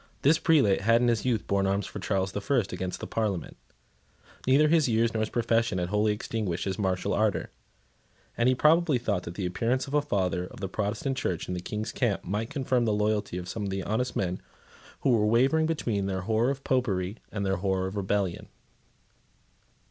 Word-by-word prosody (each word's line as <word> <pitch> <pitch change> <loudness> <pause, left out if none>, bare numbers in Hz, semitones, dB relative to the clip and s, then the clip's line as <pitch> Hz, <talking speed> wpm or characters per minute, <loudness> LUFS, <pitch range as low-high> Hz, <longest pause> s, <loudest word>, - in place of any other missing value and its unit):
This 155 +4 +5
prelate 135 - +3
had 115 +3 +4
in 120 - +4
his 115 0 0
youth 120 -4 0
borne 100 -1 +1
arms 100 +1 0
for - - -7
Charles 95 -1 -1
the 100 - -4
First 105 -1 0
against 95 -1 -4
the - - -4
Parliament. 105 -5 -2 0.9
Neither 140 +4 +5
his 155 -4 +3
years 115 0 +2
nor 110 - -1
his 110 - -1
profession 115 -3 +1
had 90 -1 -1
wholly 105 +1 +2
extinguished 105 -4 -3
his 95 0 -3
martial 95 -3 0
ardour; 105 -1 0 0.8
and 120 +2 +3
he 130 - +3
probably 155 +1 +4
thought 105 -6 -1
that 85 - -7
the 95 - -3
appearance 115 +8 0
of 140 - -9
a 150 - +4
father 90 - -1
of - - -13
the 100 - -3
Protestant 110 +7 -2
Church 90 -9 -2
in - - -3
the 90 - -3
King's 105 +4 -4
camp 115 -6 0
might 105 +5 -2
confirm 130 -4 0
the 110 - +1
loyalty 105 -3 0
of 90 -1 -6
some 100 +1 -3 0.2
honest 125 +4 -1
men 90 -1 -1 0.6
who 135 - +3
were 105 -3 +3
wavering 135 +8 +3
between 115 -11 -1
their 95 -1 -2
horror 110 +5 +1
of 135 0 -3
Popery 105 -6 0
and 100 -2 -3
their 95 0 +1
horror 95 0 0
of 95 +2 -5
rebellion. 100 -2 -1
105 Hz, 200 wpm, -28 LUFS, 95-120 Hz, 0.9 s, This